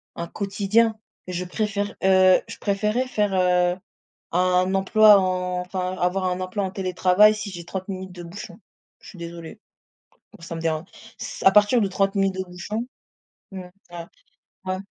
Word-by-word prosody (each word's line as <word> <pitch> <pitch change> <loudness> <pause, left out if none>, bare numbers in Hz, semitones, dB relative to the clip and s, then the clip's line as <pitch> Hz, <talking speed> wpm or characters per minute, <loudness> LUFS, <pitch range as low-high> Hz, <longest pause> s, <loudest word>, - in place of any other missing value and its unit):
un 170 - -5
quotidien. 210 +4 +1 0.3
Je 180 0 -3
préfère 205 +2 -2
heu, 185 -1 +5
je - - -9
préférais 210 +5 0
faire 210 -5 0
heu, 180 -1 +2 0.5
un 180 +1 +2
emploi 210 +2 +6
en 180 -1 -1
enfin 185 0 -4
avoir 185 +2 0
un 180 0 -1
emploi 185 +2 -3
en 190 - -4
télétravail 190 +2 +3
si 210 -1 -6
j'ai 175 -2 -8
30 190 +2 -6
minutes 190 -1 -6
de 175 -1 -9
bouchon. 175 +2 -10 0.4
Je - - -13
suis 190 - -13
désolée, 170 -1 -9 0.8
ça 170 0 -7
me - - -5
déran 160 -1 -1 0.3
ç - - -7
à 190 - +7
partir 210 +4 +5
de 200 - +1
30 195 +1 0
minutes 195 -1 +1
de 190 - -3
bouchon 195 +6 -5 0.7
mmh, 190 -1 -7 0.3
ah, 170 -1 -8 0.6
ouais. 185 - -1
185 Hz, 165 wpm, -23 LUFS, 180-200 Hz, 0.8 s, à